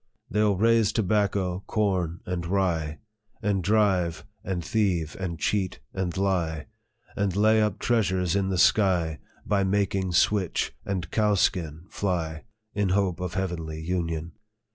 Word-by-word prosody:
" - - -49
They 105 - 0
11 105 -3 +3
raise 115 0 +4
tobacco, 100 -3 0
corn, 95 -6 0
and 90 -2 -3
rye, 85 -5 0 0.5
And 100 -2 +1
drive, 95 -5 +2 0.2
and 90 -3 -3
thieve, 90 -8 0
and 90 -3 -3
cheat, 95 +1 -1
and 95 -1 -2
lie, 85 -6 0 0.5
And 100 -3 0
lay 110 +2 +4
up 105 -2 0
treasures 95 -6 +1
in 100 -1 +1
the 95 - 0
sky, 85 -5 +3 0.3
By 100 -2 +2
making 95 -1 0
switch 95 0 +2
and 90 -5 -3
cowskin 90 -7 +1
fly, 80 -4 -2 0.3
In 100 -2 0
hope 95 -2 +1
of 90 -2 -4
heavenly 80 -4 -3
union. 85 -1 -2
95 Hz, 140 wpm, -26 LUFS, 85-100 Hz, 0.5 s, raise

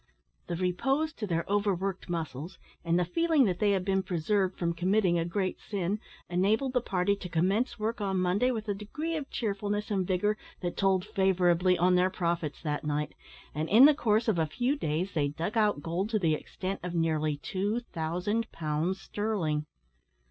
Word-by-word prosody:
The 175 - -2
repose 270 - 0
to 215 -8 -5
their 170 -2 0
overworked 195 -2 -1
muscles, 165 0 -4 0.3
and 170 0 +2
the 180 - +2
feeling 315 - +3
that 180 -4 0
they 210 - +3
had 190 -2 +1
been 190 -1 +2
preserved 190 +1 0
from 170 -1 0
committing 180 0 +2
a 165 - 0
great 185 +2 -2
sin, 200 0 -2 0.3
enabled 210 +9 +1
the 250 - +2
party 195 -2 +1
to 180 - -7
commence 190 +9 +1
work 220 +1 -2
on 195 -2 0
Monday 185 +7 +2
with 220 -4 -3
a 205 - +1
degree 300 +12 -4
of 290 -3 -4
cheerfulness 205 -2 -2
and 190 -3 0
vigour 210 +3 +1 0.2
that 175 -1 -3
told 190 -1 +2
favourably 185 -3 +3
on 180 +2 +3
their 180 +1 +4
profits 170 -5 -2
that 150 -2 -2
night, 150 0 -2 0.4
and 155 +2 -2
in 235 +6 +8
the 300 - +8
course 225 -4 +1
of 205 -6 +2
a 160 - +2
few 245 - 0
days 175 - -2
they 145 -3 +1
dug 165 +9 -4
out 210 -9 +2
gold 175 +5 -1
to 225 - +1
the 165 -6 +2
extent 185 +5 -4
of 180 0 -5
nearly 155 -2 +1
two 200 +9 -2
thousand 180 +8 -1
pounds 160 +4 -1
sterling. 170 -9 -2
185 Hz, 185 wpm, -29 LUFS, 170-210 Hz, 0.4 s, in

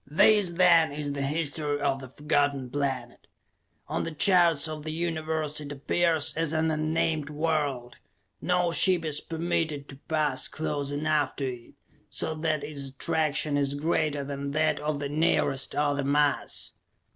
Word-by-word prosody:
This, 185 +5 +4
then, 170 -3 +5
is 145 0 -3
the 140 - -3
history 145 0 -1
of 140 -1 0
the 130 - -9
Forgotten 145 -2 0
Planet. 130 -3 -3 0.6
On - - -2
the - - -3
charts 170 -1 +3
of 155 -1 -6
the 155 +1 -5
Universe 160 -2 -2
it 145 -1 -7
appears 160 +2 +1
as 165 -1 0
an 160 0 +1
unnamed 155 -1 0
world. 150 -5 -2 0.4
No 180 -1 +1
ship 175 -1 +4
is 150 -2 -1
permitted 160 -3 -2
to 135 - -10
pass 150 -5 +1
close 145 -3 -3
enough 150 +1 0
to 135 -3 -2
it - - -20 0.4
so 160 - -2
that 155 -1 -1
its 140 -3 -5
attraction 150 +1 0
is 140 0 0
greater 150 -1 0
than 140 0 -4
that 155 +1 +1
of 150 0 -2
the 145 0 -3
nearest 140 -3 +1
other 145 -1 +1
mass. 145 +1 0
150 Hz, 155 wpm, -27 LUFS, 140-160 Hz, 0.6 s, then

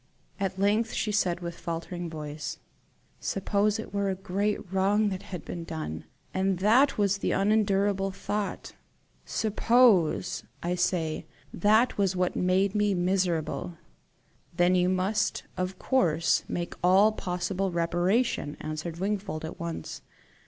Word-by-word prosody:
At 195 -1 -2
length 210 +3 +2
she 215 - -1
said, 180 -4 +1
with 170 -1 -6
faltering 170 +1 -4
voice: 150 -1 -6 0.6
"Suppose 200 +2 0
it 220 - -7
were 200 -1 0
a 190 - -1
great 195 +1 -2
wrong 205 +3 +3
that 190 -1 -4
had 180 -4 -8
been 170 -1 -5
done, 155 - -5 0.3
and 190 0 +1
that 235 +9 +4
was 200 -1 +2
the - - 0
unendurable 200 -1 +2
thought? 205 +1 -4 0.5
SUPPOSE, 220 -4 +3 0.2
I 175 +1 0
say, 175 -3 -1 0.3
that 215 +5 +3
was 195 -2 +2
what 180 0 0
made 185 +2 +2
me 205 -2 +2
miserable!" 175 -2 -1 0.8
"Then 175 +1 +4
you 180 0 +3
must 185 +3 0
of 185 +1 -3
course 170 - +2
make 175 -1 -3
all 190 +4 +6
possible 185 -1 -2
reparation," 175 +1 0
answered 155 +2 -5
Wingfold 195 -4 -2
at 160 - -8
once. 170 -1 -5
190 Hz, 130 wpm, -28 LUFS, 175-205 Hz, 0.8 s, all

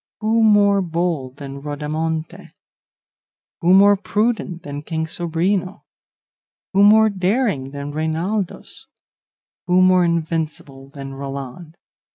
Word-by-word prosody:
Who 220 +1 +2
more 205 -2 +4
bold 165 -7 -2
than 140 -1 -8
Rodamonte? 155 +2 -4 1.1
Who 180 +2 +4
more 200 +1 +7
prudent 210 -4 -2
than 145 0 -6
King 160 +1 -3
Sobrino? 175 +4 -2 0.9
Who 195 - +4
more 215 +1 +6
daring 190 - 0
than 140 +1 -6
Reinaldos? 165 +6 -3 0.8
Who 180 +1 +4
more 185 -1 +5
invincible 160 -5 -3
than 135 -1 -8
Roland? 140 +4 -7
170 Hz, 105 wpm, -20 LUFS, 145-195 Hz, 1.1 s, more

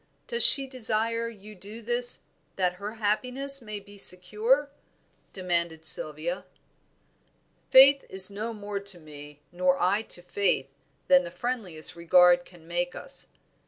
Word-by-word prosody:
does 470 0 -4
she 275 - +6
desire 230 -2 -1
you 215 -1 -14
to 195 - -21
do 210 +3 -10
this 240 +2 +6 0.3
that 180 -1 -2
her 210 +2 -7
happiness 250 +6 -1
may 215 -2 -8
be 205 0 -17
secure?" 215 +11 -1 0.6
demanded 170 -3 -4
Sylvia. 155 +4 +2 1.3
"Faith 275 +1 +6
is 190 +1 +7
no 215 +3 -6
more 205 -2 -7
to 200 -2 -8
me, 150 -2 -14
nor 180 +1 -1
I 195 +4 0
to 175 -5 -1
Faith, 180 -8 -2 0.4
than 180 0 +4
the 170 - -8
friendliest 180 -5 -5
regard 175 +1 +3
can 170 -3 -19
make 175 +1 -4
us. - - -6
200 Hz, 140 wpm, -25 LUFS, 175-230 Hz, 1.3 s, is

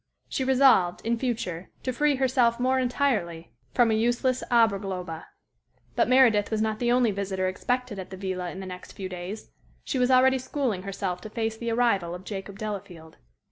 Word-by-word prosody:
She 265 - -2
resolved, 255 -9 +4
in 230 0 0
future, 190 -9 -3
to 255 - -2
free 295 +2 +2
herself 255 -3 +2
more 260 +1 +2
entirely 235 -11 -1 0.2
from 240 -3 +3
a - - +2
useless 240 +3 +1
Aberglaube. 195 -7 0 0.7
But - - +3
Meredith 235 -6 +5
was 220 - -1
not 215 0 -1
the 240 -1 +1
only 245 -2 +3
visitor 190 -1 -2
expected 245 +3 -2
at 185 - -7
the 190 - -8
villa 185 -2 -3
in 190 - -7
the - - -6
next 180 -1 -9
few 190 - -5
days. 185 +4 -7 0.3
She 265 - -2
was 250 0 +3
already 260 +1 +5
schooling 255 -7 -2
herself 190 -2 -4
to 215 - -8
face 225 0 -2
the 235 +1 -4
arrival 200 -7 +1
of 180 - -10
Jacob 195 0 -7
Delafield. 195 -6 -7
220 Hz, 180 wpm, -26 LUFS, 185-250 Hz, 0.7 s, Meredith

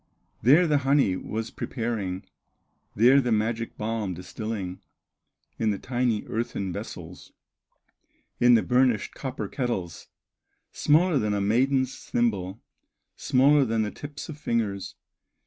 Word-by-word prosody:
There 150 +9 +6
the 150 -3 +2
honey 135 -8 +2
was 110 +4 -4
preparing, 110 -6 -3 0.7
There 125 +6 +6
the 120 -2 -1
magic 115 +1 -1
balm 105 -4 -2
distilling 95 +1 -5 0.8
In 110 - +1
the 100 - 0
tiny 120 -3 -1
earthen 100 -5 -3
vessels, - - -8 1.1
In 120 0 +6
the 115 - +3
burnished 125 -4 +2
copper 135 0 -5
kettles, 95 - -4 0.6
Smaller 155 0 +3
than 105 -2 0
a - - 0
maiden's 130 +5 +2
thimble, 100 -4 -1 0.6
Smaller 140 +3 +4
than 115 -3 0
the 105 - -3
tips 145 0 -8
of 150 -2 -8
fingers. 110 -8 -2
115 Hz, 120 wpm, -26 LUFS, 105-130 Hz, 1.1 s, There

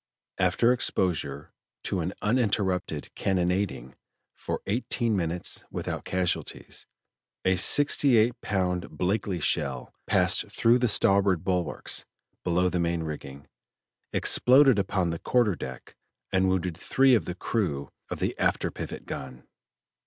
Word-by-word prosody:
After 95 +7 +3
exposure 75 - -1 0.3
to 95 - -1
an 90 +3 -2
uninterrupted 100 - 0
cannonading 90 -8 -1 0.4
for - - -5
eighteen 115 +1 0
minutes 85 -1 -1
without - - -5
casualties, 90 -2 -2 0.6
a 95 0 +4
sixty 140 +5 +4
eight 115 +3 +4
pound 90 -1 -2
Blakely 95 0 -1
shell 65 -4 -1
passed - - +3
through 120 +2 +3
the 125 - +2
starboard 100 -4 +2
bulwarks 90 -4 -2 0.4
below 90 +1 +2
main 85 -1 0
rigging, 70 -2 -7 0.7
exploded 130 -3 +5
upon 95 -3 0
the 80 - -4
quarter 120 -5 +2
deck, 65 -4 -9 0.4
and 95 0 +2
wounded 90 -2 -1
three 135 +9 +3
of 115 - +3
the 90 - -5
crew 85 -9 -2 0.2
of - - -4
the - - -1
after - - +1
pivot - - -7
gun. 65 -2 -7
95 Hz, 125 wpm, -27 LUFS, 85-105 Hz, 0.7 s, exploded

